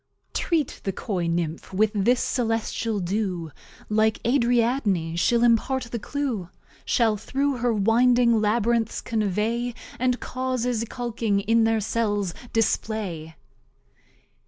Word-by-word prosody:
Treat 325 -4 -1
the 195 - -1
Coy 180 -3 -3
Nymph 170 -1 -2
with 215 +2 +3
this 235 +5 +2
Celestial 225 -2 -1
Dew, 180 -3 -2 0.4
Like 220 0 +2
Ariadne 235 -8 +1
she'll 235 +7 +2
impart 240 +3 +2
the 235 - -2
Clue; 240 -8 -3 0.3
Shall 225 -3 +2
through 275 +5 -1
her 245 0 +1
Winding 235 +2 +4
Labyrinths 225 +1 +1
convey, 225 +3 -1 0.2
And 250 0 +1
Causes, 250 -2 -2
iculking 225 -4 -2
in 225 0 +4
their 225 -1 +2
Cells, 205 -4 -1 0.2
display. 200 -7 -1
225 Hz, 110 wpm, -25 LUFS, 205-240 Hz, 0.4 s, Winding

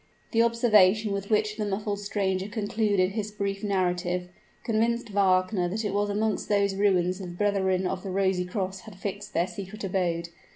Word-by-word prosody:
The 230 - +3
observation 215 -3 +4
with 200 0 -3
which 215 -1 +1
the 215 - -1
muffled 205 +1 -2
stranger 195 -2 -1
concluded 205 -3 0
his 210 0 -3
brief 200 -1 -3
narrative, 180 -2 0 0.3
convinced 230 0 0
Wagner 185 -1 +2
that 215 +4 -3
it 200 - -1
was 205 0 +1
amongst 210 0 -1
those 200 -1 +2
ruins 185 -2 +2
the 190 - -6
brethren 190 0 0
of 185 0 -2
the 195 - -6
Rosy 190 -1 +1
Cross 190 0 -3
had 215 0 -12
fixed 205 +2 -6
their 170 - +3
secret 200 +2 -8
abode. 175 -3 -1
200 Hz, 170 wpm, -27 LUFS, 185-210 Hz, 0.3 s, observation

